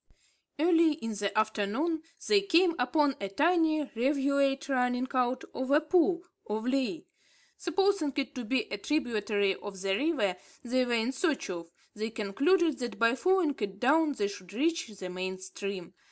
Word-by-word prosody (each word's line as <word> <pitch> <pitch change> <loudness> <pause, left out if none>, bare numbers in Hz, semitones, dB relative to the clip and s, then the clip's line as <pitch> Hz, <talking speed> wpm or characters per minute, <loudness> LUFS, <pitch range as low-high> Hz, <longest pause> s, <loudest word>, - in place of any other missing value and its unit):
Early 330 0 +4
in 225 -7 -5
the 205 -1 -2
afternoon, 220 +10 0 0.3
they 410 -1 +5
came 360 -2 +4
upon 275 +3 +2
a 195 - -3
tiny 315 - +2
rivulet 275 +2 +1
running 250 -1 +1
out 250 0 +1
of 260 0 -3
a 290 +2 +5
pool, 345 +2 +2 0.2
or 215 +1 -3
vley. 270 +5 -1 0.5
Supposing 380 -3 +1
it 280 0 -2
to 250 -3 -5
be 245 +2 +1
a 200 - -3
tributary 210 -7 0
of 200 -2 -8
the 195 0 0
river 215 - 0 0.3
they 255 +1 +1
were 240 - -1
in 230 +2 +1
search 275 - -1
of, 170 -2 -6 0.2
they 215 +1 -3
concluded 275 - +1
that 240 -1 -4
by 230 0 +4
following 365 +1 +2
it 200 -2 -4
down, 300 +5 +3
they 205 -6 -1
should 200 -2 -10
reach 320 +6 0
the 195 -4 -8
main 185 +1 -4
stream. 190 -1 -6
255 Hz, 165 wpm, -30 LUFS, 210-310 Hz, 0.5 s, they